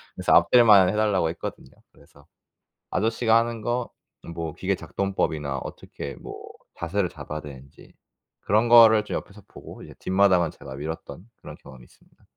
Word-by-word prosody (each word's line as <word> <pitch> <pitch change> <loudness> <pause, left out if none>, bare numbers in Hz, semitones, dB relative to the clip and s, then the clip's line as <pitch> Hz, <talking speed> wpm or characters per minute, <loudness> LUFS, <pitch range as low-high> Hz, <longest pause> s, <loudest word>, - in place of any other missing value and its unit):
그래서 - - 0
앞뜰만 105 -7 +6
해달라고 105 -5 +1
했거든요. 80 -5 -7 0.2
그래서 70 0 -22 0.7
아저씨가 115 +3 +1
하는 115 -1 -1
거, 120 +2 -2 0.5
뭐 80 -2 -5
기계 95 +2 -2
작동법이나 80 -9 -3
어떻게 70 +2 -8
뭐 - - -10 0.4
자세를 90 +2 -1
잡아야 75 0 -8
되는지 70 -2 -14 0.5
그런 110 +4 +1
거를 115 -2 +7
좀 - - -5
옆에서 100 +1 -8
보고 - - -13
이제 - - -12
뒷마당은 95 -3 +2
제가 65 -1 -11
밀었던 80 - -8
그런 - - -10
경험이 65 -2 -14
있습니다. - - -27
95 Hz, 365 characters per minute, -24 LUFS, 75-110 Hz, 0.7 s, 거를